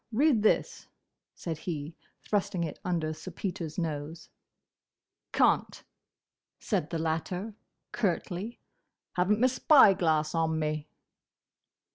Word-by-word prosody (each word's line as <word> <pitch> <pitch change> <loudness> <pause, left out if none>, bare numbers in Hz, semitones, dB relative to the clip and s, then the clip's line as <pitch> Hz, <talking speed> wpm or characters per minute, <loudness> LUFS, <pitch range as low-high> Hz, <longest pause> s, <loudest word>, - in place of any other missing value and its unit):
Read 260 0 +3
this!" 215 - +1 0.5
said 165 -3 -5
he, 155 -2 -5 0.3
thrusting 200 -3 0
it 160 - -5
under 165 -3 -1
Sir 155 +4 -9
Peter's 170 -3 -5
nose. 160 -1 -4 1.0
"Can't," - - +2 0.8
said 150 - -1
the 165 - -2
latter, 165 +6 -2 0.4
curtly, 200 +1 -2 0.6
"haven't 190 +4 +2
my 250 - +4
spy 260 -4 +6
glass 160 -4 +1
on 160 -1 +1
me!" 155 -1 -2
170 Hz, 105 wpm, -29 LUFS, 160-200 Hz, 1.0 s, spy